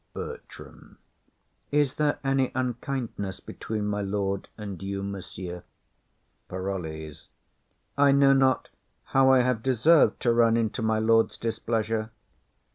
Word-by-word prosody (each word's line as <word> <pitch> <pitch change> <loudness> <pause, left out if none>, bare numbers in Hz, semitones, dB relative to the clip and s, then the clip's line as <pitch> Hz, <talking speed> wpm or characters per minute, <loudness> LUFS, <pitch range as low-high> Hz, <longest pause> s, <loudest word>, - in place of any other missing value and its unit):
BERTRAM. - - -10 0.7
Is 145 -2 +2
there 150 -1 +1
any 135 -1 +1
unkindness 125 -5 -3
between 105 -1 -5
my 105 0 -1
lord 100 -1 -2
and 100 -4 -7
you, 100 0 -4
monsieur? 95 -2 -6 0.9
PAROLLES. 80 -5 -5 0.7
I 140 -1 +6
know 140 0 +5
not 135 -1 +2 0.3
how 135 0 +4
I 130 -1 +6
have 125 -2 0
deserved 130 +6 +4
to 120 - +3
run 115 -1 +4
into 115 +1 -1
my 110 0 +1
lord's 115 +1 +2
displeasure. 110 -1 -2
115 Hz, 120 wpm, -26 LUFS, 100-130 Hz, 0.9 s, I